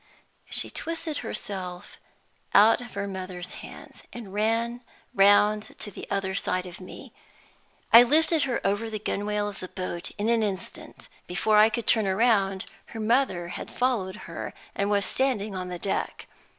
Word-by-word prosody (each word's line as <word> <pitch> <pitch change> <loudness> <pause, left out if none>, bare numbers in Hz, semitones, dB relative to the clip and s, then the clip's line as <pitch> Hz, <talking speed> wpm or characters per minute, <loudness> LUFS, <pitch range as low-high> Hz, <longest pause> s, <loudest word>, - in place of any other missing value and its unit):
She - - -1
twisted 325 -2 -3
herself 185 -6 -6 0.6
out 225 +3 +7
of 245 - -10
her 200 0 -2
mother's 185 -2 -5
hands, - - -11
and 220 -5 -9
ran 230 +3 0 0.3
round 205 +2 +4
to 205 - -5
the - - -9
other 195 -1 -1
side 185 -1 -1
of 180 0 -9
me. 185 - -11 0.8
I 230 - +12
lifted 310 +5 +3
her 245 - 0
over 205 +3 0
the 215 - -3
gunwale 205 0 -1
of 205 - -7
the 185 - -6
boat 180 -2 -5
in 210 +1 -1
an 230 -1 +3
instant. 195 -3 -5 0.2
Before 210 +4 +3
I 215 +1 +7
could 230 0 -3
turn 220 -3 +3
round, 195 -2 +2 0.2
her 225 - -8
mother 215 -6 +1
had - - -6
followed 230 -7 0
her, - - -6 0.2
and 200 0 -1
was 200 -1 +2
standing 230 -6 0
on 185 -1 -4
the 180 - -4
deck. 195 +3 -3
205 Hz, 165 wpm, -27 LUFS, 190-230 Hz, 0.8 s, I